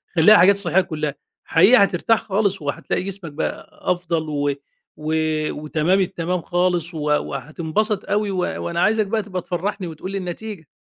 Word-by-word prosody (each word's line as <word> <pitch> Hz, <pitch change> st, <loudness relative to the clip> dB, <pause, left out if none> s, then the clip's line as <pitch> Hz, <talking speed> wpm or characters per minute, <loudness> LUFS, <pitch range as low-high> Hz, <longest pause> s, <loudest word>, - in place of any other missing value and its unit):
خلّيها 190 Hz, +6 st, +7 dB
حاجات 200 Hz, +2 st, +6 dB
صحية 190 Hz, -2 st, +2 dB
كُلّها، 155 Hz, -5 st, -3 dB, 0.3 s
حقيقي 200 Hz, +6 st, +6 dB
هترتاح 200 Hz, +4 st, +2 dB
خالص، 200 Hz, -3 st, 0 dB
وهتلاقي 145 Hz, +5 st, -2 dB
جسمك 195 Hz, -4 st, -6 dB
بقى 155 Hz, -, -4 dB, 0.2 s
أفضل، 170 Hz, -3 st, -2 dB
و 145 Hz, -1 st, 0 dB, 0.4 s
و 155 Hz, +1 st, -3 dB, 0.4 s
وتمام 155 Hz, +5 st, 0 dB
التمام 180 Hz, -1 st, -1 dB
خالص، 175 Hz, -1 st, 0 dB
و 160 Hz, -, -5 dB
وهتنبسط 160 Hz, +7 st, -1 dB
أوي، 205 Hz, 0 st, +1 dB
و 190 Hz, -, -3 dB, 0.3 s
وأنا 170 Hz, 0 st, -1 dB
عايزك 215 Hz, 0 st, +2 dB
بقى 220 Hz, +2 st, 0 dB
تبقى 185 Hz, -3 st, -4 dB
تفرحني 185 Hz, +2 st, -3 dB
وتقول 165 Hz, +4 st, -7 dB
لي 195 Hz, -, -2 dB
النتيجة. 185 Hz, -1 st, -6 dB
180 Hz, 155 wpm, -21 LUFS, 160-200 Hz, 0.4 s, خلّيها